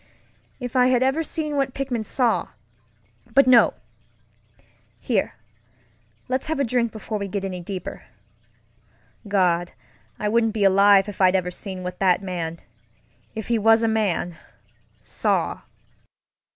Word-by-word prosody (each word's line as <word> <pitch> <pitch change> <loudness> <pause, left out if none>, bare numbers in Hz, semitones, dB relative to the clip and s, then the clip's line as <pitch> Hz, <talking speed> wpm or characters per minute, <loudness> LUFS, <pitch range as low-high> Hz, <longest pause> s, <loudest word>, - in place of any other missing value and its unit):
If 245 -2 -6
I 250 -1 +5
had 255 0 +3
ever 270 +5 +1
seen 305 -2 -3
what 270 -2 -1
Pickman 265 -4 -2
sawŌĆöbut 250 +3 -2
no! 250 -2 +5 1.2
Here, - - -1 0.9
let's 260 +3 -2
have 315 -2 -2
a - - +3
drink 235 -2 0
before 215 0 -5
we 200 - -3
get 195 0 -3
any 185 -2 -4
deeper. 180 +1 -7 1.2
Gad, 175 -3 +1 0.4
I 210 - -2
wouldn't 225 0 +2
be 210 - 0
alive 195 0 +5
if 205 -1 -6
I'd 185 0 +5
ever 180 -1 0
seen 185 0 -6
what 180 0 -6
that 185 0 +2
manŌĆöif 170 -3 -5 0.8
he 235 -1 0
was 225 +1 +4
a - - +3
manŌĆösaw! 200 -6 -3
215 Hz, 125 wpm, -23 LUFS, 185-250 Hz, 1.2 s, I